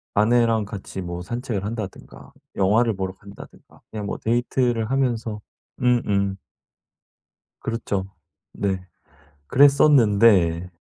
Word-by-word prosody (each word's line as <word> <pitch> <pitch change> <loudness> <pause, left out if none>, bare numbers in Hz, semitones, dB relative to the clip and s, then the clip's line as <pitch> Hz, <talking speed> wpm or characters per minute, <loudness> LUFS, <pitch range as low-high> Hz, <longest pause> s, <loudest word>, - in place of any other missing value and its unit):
아내랑 115 0 +3
같이 100 -2 -7
뭐 85 0 -5
산책을 115 0 -4
한다든가 110 -3 -7 0.2
영화를 110 +3 +2
보러 95 -1 -4
간다든가 100 +1 -15
그냥 105 -2 -5
뭐 - - -4
데이트를 120 0 0
하면서 115 -5 -1 0.4
음음. 100 -6 +1 1.2
그렇죠. 105 -4 -3 0.5
네. 95 -2 -2 0.6
그랬었는데 110 - +4
110 Hz, 240 characters per minute, -23 LUFS, 95-120 Hz, 1.2 s, 그랬었는데